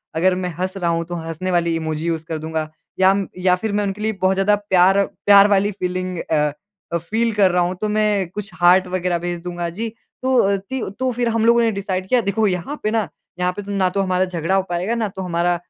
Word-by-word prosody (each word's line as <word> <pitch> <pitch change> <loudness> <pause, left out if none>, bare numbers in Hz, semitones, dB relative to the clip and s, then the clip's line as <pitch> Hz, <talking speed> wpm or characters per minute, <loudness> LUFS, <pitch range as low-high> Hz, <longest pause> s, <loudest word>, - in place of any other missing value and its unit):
अगर 180 +3 +3
मैं 180 0 -2
हँस 185 +1 -2
रहा 175 -3 0
हूँ 165 0 0
तो 175 +1 -6
हँसने 165 +2 -4
वाली 170 -1 +1
इमोजी 160 -1 -3
यूज़ 165 -1 -2
कर 165 -1 -4
दूँगा। 160 0 -3 0.3
या 190 +1 +6
म 195 -1 -1
या 180 0 +3
फिर 215 +4 -3
मैं 205 0 +1
उनके 200 +1 -3
लिए 220 +1 0
बहुत 185 0 +3
ज़्यादा 195 +2 +3
प्यार 190 -2 +3
प्यार 200 0 +5
वाली 200 0 +3
अ, - - -10
फ़ीलिंग 185 0 -2
अ 150 -2 0 0.4
अ, - - +3
फ़ील 220 +8 -1
कर 195 -3 +4
रहा 180 0 +2
हूँ 180 +1 -2
तो 215 - 0
मैं 210 -3 +1
कुछ 210 +3 -7
हार्ट 180 +2 +5
वग़ैरह 180 -1 -1
भेज 175 0 -3
दूँगा, 175 -1 -4
जी। 215 +7 -4 0.4
तो 260 0 +2
अ, 200 -2 +3
तिव 220 +5 -5
तो 260 0 +1
फिर 240 0 -1
हम 225 -1 +1
लोगों 235 +1 +5
ने 230 -1 +2
डिसाइड 190 -2 -3
किया। 250 -1 +4
देखो 205 +1 0
यहाँ 185 - -3
पे 215 - 0
ना, 220 -3 0 0.3
यहाँ 180 0 +1
पे 205 - -6
तो 205 0 -7
ना 190 -2 +1
तो 195 +2 -1
हमारा 185 -1 +1
झगड़ा 180 0 -1
हो 195 - +2
पाएगा 180 +6 -1
ना 225 -2 -1
तो 190 0 -7
हमारा 175 -1 0
185 Hz, 250 wpm, -20 LUFS, 175-205 Hz, 0.4 s, या